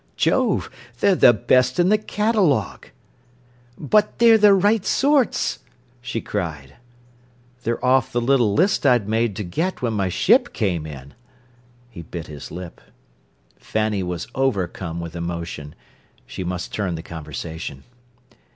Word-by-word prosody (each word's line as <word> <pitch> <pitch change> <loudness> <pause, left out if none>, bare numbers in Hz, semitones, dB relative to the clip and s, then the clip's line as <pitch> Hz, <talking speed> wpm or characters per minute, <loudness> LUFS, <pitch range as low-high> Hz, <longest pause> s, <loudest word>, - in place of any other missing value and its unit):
"Jove! 255 -6 +1 0.3
they're 200 - +4
the 175 - +6
best 125 +3 +2
in 175 +1 +4
the 215 - +4
catalogue." 210 - 0 0.9
"But 210 +8 +1
they're 230 -1 +6
the 205 -1 +6
right 205 +2 +2
sorts?" 280 +1 +1 0.4
she 120 -2 -4
cried. 80 -10 -5 0.8
"They're 120 +1 -2
off 130 -1 +3
the 120 - 0
little 120 -3 +2
list 190 +3 +2
I'd 125 -7 +3
made 110 -1 0
to 105 - -4
get 160 - -3
when 115 -2 0
my 100 -3 0
ship - - +3
came 85 -7 -1
in." 70 -2 -10 0.8
He 100 - -9
bit 85 0 -7
his 75 -3 -9
lip. 90 -1 -9 0.8
Fanny 110 -2 -1
was 90 -2 -4
overcome 95 -9 -2
with 85 0 -7
emotion. 85 -3 -5 0.5
She 95 - -6
must 90 0 -5
turn 95 -5 -2
the 80 - -7
conversation. 80 -3 -7
110 Hz, 135 wpm, -22 LUFS, -, 0.9 s, the